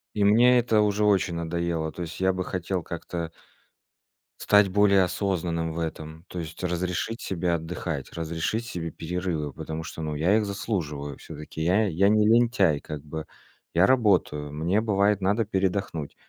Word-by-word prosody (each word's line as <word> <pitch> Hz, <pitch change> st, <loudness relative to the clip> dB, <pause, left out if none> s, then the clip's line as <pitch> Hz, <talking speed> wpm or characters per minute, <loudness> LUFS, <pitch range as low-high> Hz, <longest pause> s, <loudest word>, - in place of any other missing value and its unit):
И 105 Hz, -, +1 dB
мне 120 Hz, +5 st, +6 dB
это 110 Hz, -3 st, +3 dB
уже 105 Hz, 0 st, +1 dB
очень 95 Hz, -4 st, +2 dB
надоело. 85 Hz, -1 st, -2 dB
То 90 Hz, -, -6 dB
есть 80 Hz, -1 st, -7 dB
я 95 Hz, 0 st, +2 dB
бы 90 Hz, 0 st, -2 dB
хотел 90 Hz, -1 st, -3 dB
как-то 85 Hz, 0 st, -5 dB, 1.1 s
стать 105 Hz, -1 st, +5 dB
более 100 Hz, 0 st, +4 dB
осознанным 85 Hz, -3 st, -1 dB
в 85 Hz, -, -4 dB
этом. 80 Hz, 0 st, -6 dB
То 90 Hz, -, -6 dB
есть 85 Hz, +1 st, -7 dB
разрешить 90 Hz, +4 st, -2 dB
себе 90 Hz, -1 st, -1 dB
отдыхать, 80 Hz, -3 st, -4 dB
разрешить 85 Hz, +8 st, -2 dB
себе 85 Hz, -7 st, -5 dB
перерывы. 85 Hz, -4 st, -3 dB
Потому 80 Hz, 0 st, -5 dB
что, 80 Hz, -, -7 dB
ну 75 Hz, -1 st, -3 dB
я 90 Hz, +8 st, +3 dB
их 110 Hz, -, +1 dB
заслуживаю 80 Hz, -, -3 dB
всё-таки. 75 Hz, 0 st, -8 dB
Я 95 Hz, +7 st, +3 dB
я 95 Hz, +3 st, +3 dB
не 105 Hz, 0 st, +4 dB
лентяй 115 Hz, -9 st, +4 dB
как 75 Hz, -1 st, -7 dB
бы, 80 Hz, +1 st, -6 dB, 0.5 s
я 85 Hz, +3 st, +5 dB
работаю. 95 Hz, -, +2 dB
Мне 85 Hz, +8 st, 0 dB
бывает 100 Hz, -2 st, +2 dB
надо 105 Hz, +4 st, +1 dB
передохнуть. 95 Hz, -6 st, -2 dB
90 Hz, 160 wpm, -26 LUFS, 80-100 Hz, 1.1 s, мне